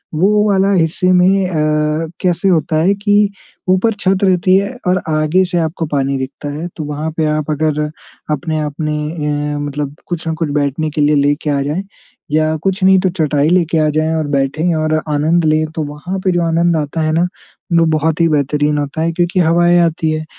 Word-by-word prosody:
वो 210 +5 +3
वाला 195 0 +2
हिस्से 180 +1 +1
में 185 +1 +3
अ, 155 -1 0
कैसे 180 +1 0
होता 160 -3 +1
है 195 +3 +3
कि 205 0 +2 0.4
ऊपर 190 +5 +3
छत 190 0 +1
रहती 185 -1 +3
है 200 +5 -2
और 180 0 +2
आगे 155 +4 +2
से 180 -1 -2
आपको 165 +1 -2
पानी 140 -1 0
दिखता 135 +2 -6
है। 160 +4 -5
तो 160 - -4
वहाँ 150 +2 -4
पे 160 - +1
आप 155 0 -1
अगर 150 0 0 0.5
अपने-अपने 150 0 -2 0.6
ए - - -3
मतलब 145 0 -4
कुछ 170 -2 -4
न 160 - 0
कुछ 160 -1 -2
बैठने 145 +2 -1
के 150 - -2
लिए 150 +1 +3
लेके 145 +2 +1
आ 140 -1 +1
जाएँ, 150 +7 -2 0.5
या 155 +1 +1
कुछ 195 0 -1
नहीं 190 0 +6
तो 185 0 +1
चटाई 150 -2 +1
लेके 170 -2 +2
आ 155 - +2
जाएँ 155 +1 +1
और 155 -2 -1
बैठे 140 +2 -1
और 155 0 0 0.2
आनंद 160 +3 +2
लें, 155 0 +2
तो 160 - -1
वहाँ 150 +6 -5
पे 185 - +3
जो 175 -1 +1
आनंद 165 0 +1
आता 150 +1 -2
है 155 0 0
ना, 165 - +2 0.6
वो 165 - +4
बहुत 160 +2 0
ही 165 - +4
बेहतरीन 150 0 +1
होता 145 +2 -3
है। 165 +1 +1
क्योंकि 175 +2 0
हवाएँ 175 +1 +3
आती 160 -1 -1
हैं 155 0 -3
160 Hz, 200 wpm, -16 LUFS, 150-180 Hz, 0.6 s, नहीं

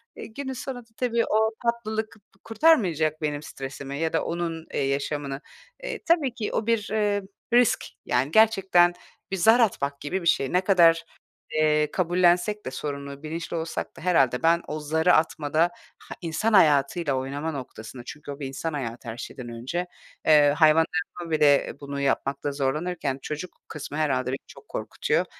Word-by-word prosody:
e, - - -8
günün 265 +4 -6
sonunda 245 -2 -6
tabii 235 -2 +1
o 220 +1 +2 0.2
tatlılık 220 -2 -1 0.3
kurtarmayacak 185 - +2
benim 150 -1 -2
stresimi 135 0 -7
ya 160 0 -1
da 160 - +1
onun, 165 -1 -3
eee, - - 0
yaşamını. 140 0 -2 0.4
Eee, - - -4
tabii 315 -7 +2
ki 230 -4 -3
o 215 - -1
bir, 230 -3 +1
eee, 205 -2 +1 0.3
risk, 245 -2 +4 0.2
yani, 125 +4 +1
gerçekten 190 -4 +5 0.4
bir 195 - 0
zar 225 +6 +5
atmak 140 -11 +1
gibi 185 +6 -2
bir 170 - -3
şey. 135 -4 +2
Ne 180 - +4
kadar, 170 -4 +5 0.5
eee, 150 -1 +2
kabullensek 180 +3 +2
de - - -4
sorumluluğu, 140 0 -6
bilinçli 165 +2 -5
olsak 165 +1 -4
da - - -11
herhâlde 135 -8 +2
ben 170 +1 +4
o 155 - -4
zarı 160 +4 +2
atmada, 155 -1 +1 0.4
ha, - - -10
insan 185 +7 -1
hayatıyla 150 -3 +4
oynama 140 +4 -3
noktasında 125 -3 -8
çünkü 145 +2 -8
o 140 - -8
bir 140 - -4
insan 155 +4 -4
hayatı 120 -3 -5
her 110 - -6
şeyden 120 0 -7
önce, 130 +10 -4 0.4
eee, 150 -2 +6
hayvanlarıma 165 +2 +2
bile 150 -2 +4
bunu 140 0 -5
yapmakta 140 +1 -1
zorlanırken 140 +1 -2
çocuk 155 +5 -6
kısmı 150 -1 -7
herhâlde 130 -5 0
beni 135 - -1
çok 430 - -15
korkutuyor. 460 +2 -1
160 Hz, 160 wpm, -25 LUFS, 140-190 Hz, 0.5 s, eee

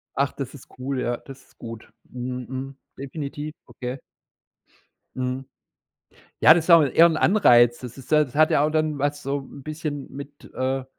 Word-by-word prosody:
Ach, 140 0 +1
das 135 -1 -6
ist 140 - -13
cool, 130 0 -2
ja, 120 0 -1
das 135 0 -13
ist - - -28
gut. 115 -1 -9 0.2
Mhm, 125 0 -5
mhm. 135 +1 -6 0.2
Definitiv, 145 +2 -6
okay. 125 +1 -6 1.2
Mhm. 130 +1 -3 1.0
Ja, 160 - +9
das 170 - 0
ist 175 - -2
auch 165 -1 +9
eher 155 +4 +5
'n 165 -2 +1
Anreiz. 120 - +5
Das 125 0 -9
ist 135 - -13
ja 150 -1 +5
das 130 - -14
hat 155 +1 +4
ja 145 - +3
auch 155 - +1
dann 155 -1 0
was 145 +1 -1
so 140 +1 -2
'n 135 +1 -12
bisschen 150 -1 -5
mit, 140 +1 -10
äh, 130 0 -1
135 Hz, 185 wpm, -24 LUFS, 130-150 Hz, 1.2 s, Ja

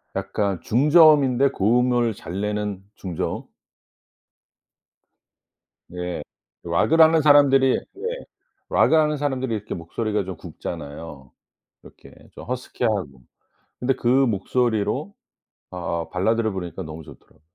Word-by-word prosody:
약간 100 -4 -2
중저음인데 140 -1 +5
고음을 120 +2 +2
잘 95 0 -6
내는 105 -2 -3
중저음? 90 -4 -4 2.5
네. 90 -2 -5 0.4
락을 105 - +1
하는 160 0 +6
사람들이 140 -3 +5
네. 465 +5 -6 0.4
락을 160 - +4
하는 150 -1 +2
사람들이 130 -4 -2
이렇게 105 -1 -5
목소리가 105 +4 -3
좀 95 -2 -6
굵잖아요. 75 -4 -8 0.5
이렇게 - - -16 0.2
좀 - - -10
허스키하고. 110 - -3 0.6
근데 130 +2 +1
그 - - -4
목소리로 120 -3 +1 0.6
아아 85 -2 -4
발라드를 110 +4 0
부르니까 90 -1 -6
너무 80 0 -8
좋더라고. - - -17
110 Hz, 265 characters per minute, -23 LUFS, 90-135 Hz, 2.5 s, 하는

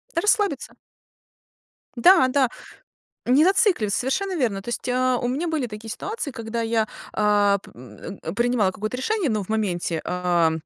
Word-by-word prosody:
Расслабиться. 395 - +1 1.2
Да, 270 +2 +6
да. 260 -1 +2 0.8
Не 265 +5 +5
зацикливаться, 365 - +2
совершенно 375 +10 -1
верно. 225 - 0
То 215 - -8
есть, 240 - -4
а, 255 0 +2
у 245 - -2
меня 280 +8 -1
были 315 -5 -1
такие 220 0 -9
ситуации, 410 - -4
когда 230 -1 -4
я, 225 -1 0 0.3
а, 205 -1 +3
п - - -16
м, 125 - -10 0.2
принимала 235 -4 +2
какое-то 215 +6 -4
решение, 390 - 0
ну, 215 -3 -1
в 190 - -15
моменте, 180 -7 -1
а, 175 -2 +1
240 Hz, 150 wpm, -23 LUFS, 205-285 Hz, 1.2 s, Да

